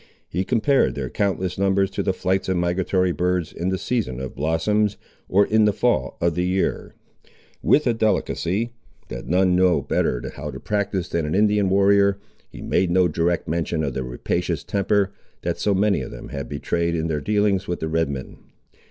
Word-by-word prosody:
He 90 +3 -2
compared 125 +6 +2
their 65 -3 -4
countless 95 -2 -1
numbers 95 0 +2
to - - -2
the 95 - +1
flights 95 +1 -1
of 95 - +1
migratory 90 +1 +1
birds 90 -1 -1
in 90 +2 -2
the 95 - 0
season 100 - -2
of 65 0 -5
blossoms, 95 +8 0 0.3
or 100 +2 +4
in 110 0 +3
the 105 - +3
fall - - 0
of 85 -1 +1
the 90 - -1
year. 90 +1 -1 0.7
With 150 - +3
a 120 - +3
delicacy, 110 0 0 0.4
that - - -7
none 90 +1 +3
know 90 -1 +4
better - - 0
how - - -5
to - - -7
practise 100 -4 -1
than 85 -3 -1
an 75 - -1
Indian 105 -1 +3
warrior, 100 +1 +4 0.3
he - - -10
made 95 - +1
no 90 0 +4
direct 85 +1 0
mention 80 -1 -1
of 70 -3 -2
the 65 - -2
rapacious 60 -1 -2
temper, 100 0 +1 0.3
that - - -2
so 100 -1 +1
many 100 0 +2
of - - -6
them - - -9
had 70 - -5
betrayed, 85 +3 -1
in 80 -1 -1
their 75 -3 -1
dealings 105 +1 +1
with 90 - -2
the 80 - -2
Red 80 -1 0
men. 65 -2 -6
95 Hz, 190 wpm, -23 LUFS, 85-100 Hz, 0.7 s, or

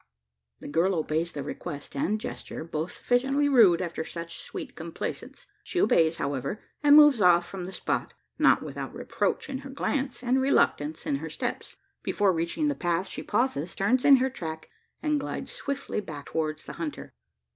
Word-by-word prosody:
The - - -8
girl 170 +6 +2
obeys 160 +1 -1
the 145 - -5
request 145 0 -7
and 205 +10 0
gesture 230 -7 -6
both 160 +1 -3
sufficiently 270 +4 +1
rude 210 -11 +6
after 170 -2 -3
such 170 0 -6
sweet - - -7
complaisance. - - -6 0.2
She 360 - -2
obeys, 165 - +4
however; 140 - -2 0.2
and 290 0 +7
moves 295 -6 +8
off 175 -1 +5
from 190 -2 -6
the 185 - -6
spot - - -2 0.2
not - - +5
without - - -6
reproach - - -1
in 270 -1 -4
her 275 0 -9
glance, 265 -1 -2
and 255 +2 +2
reluctance 160 - +1
in 140 - 0
her 160 +3 -6
steps. - - -4 0.3
Before 200 -2 +2
reaching 170 - -1
the 290 - +2
path 175 -5 0
she - - -5
pauses, 205 - -1
turns 245 +6 +2
in 280 - +8
her 260 0 +1
track, 160 -8 -6 0.3
and 300 -2 +2
glides - - -5
swiftly 280 -4 -3
back 145 -7 -8
towards 155 -1 -2
the - - -7
hunter. 155 -3 -5
185 Hz, 175 wpm, -27 LUFS, 160-265 Hz, 0.3 s, moves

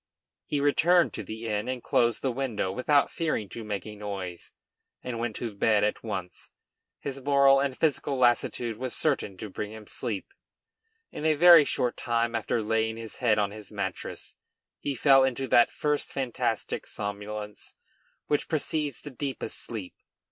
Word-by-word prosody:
He 145 - 0
returned 165 +5 +4
to - - -4
the 110 +1 -6
inn 105 +1 -1
and 130 -1 -3
closed 120 -1 +2
the 135 - +1
window 120 -7 -2
without 140 +7 +2
fearing 155 -11 -1
to 115 - -7
make 105 -3 -4
a 105 -1 -8
noise, 100 -4 -6 0.5
and 120 -2 -4
went 115 -2 -2
to 115 -3 -4
bed 105 +1 +3
at 105 - 0
once. 95 -6 -5 0.5
His 135 -1 -6
moral 140 0 +5
and 135 -2 -1
physical 145 -3 +1
lassitude 120 -2 +2
was 130 0 -3
certain 135 -10 0
to 110 - -6
bring 105 +1 -5
him 110 -1 -10
sleep. 105 -1 -3 0.9
In - - -7
a 155 -1 +3
very 170 -1 +9
short 125 -3 0
time 115 -1 0
after 115 0 -1
laying 110 +1 0
his 115 -2 -7
head 115 -4 +3
on 100 -1 +1
his 105 0 -10
mattress, - - -5 0.4
he 140 - -3
fell 135 +1 +6
into 130 0 0
that 120 - +6
first 150 -1 -1
fantastic 130 -4 -2
somnolence 105 +1 -6 0.5
which 145 - 0
precedes 150 -3 -1
the 145 - -7
deepest 130 -3 -3
sleep. 105 -6 -6
120 Hz, 165 wpm, -28 LUFS, 105-140 Hz, 0.9 s, very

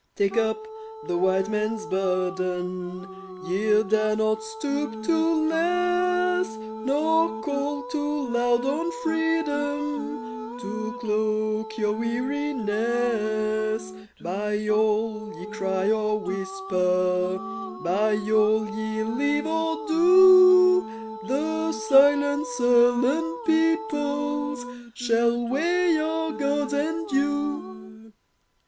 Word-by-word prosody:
Take 195 -1 0
up 230 - 0 0.4
the - - -2
White 190 +2 +1
Man's 215 +1 -2
burden 185 -1 -2 0.4
Ye 210 +3 +2
dare 215 +1 +1
not 215 0 0
stoop 220 +1 -4
to 320 +2 +1
less 360 -2 +1
Nor 265 +6 0
call 280 0 -2
too 295 -1 -2
loud 240 0 +1
on 310 +5 -1
Freedom 290 -8 -2
To 235 0 -5
cloak 215 -1 -1
your 210 -1 0
weariness; 225 -4 -1 0.3
By 210 +4 -3
all 215 0 0
ye - - -8
cry 195 -1 -1
or 215 -1 0
whisper, 185 -2 -1 0.5
By 205 +5 +1 0.2
all 215 0 +3
ye 220 0 -3
leave 285 +6 -1
or 325 +5 -2
do, 365 -9 +5
The 315 +5 -1
silent, 285 +5 +3
sullen 245 +6 +3
peoples 290 - 0 0.3
Shall 235 0 +1
weigh 345 +7 +1
your 320 +1 -1
Gods 285 0 -1
and 325 +5 -2
you. 225 -8 -3
235 Hz, 90 wpm, -25 LUFS, 215-295 Hz, 0.5 s, do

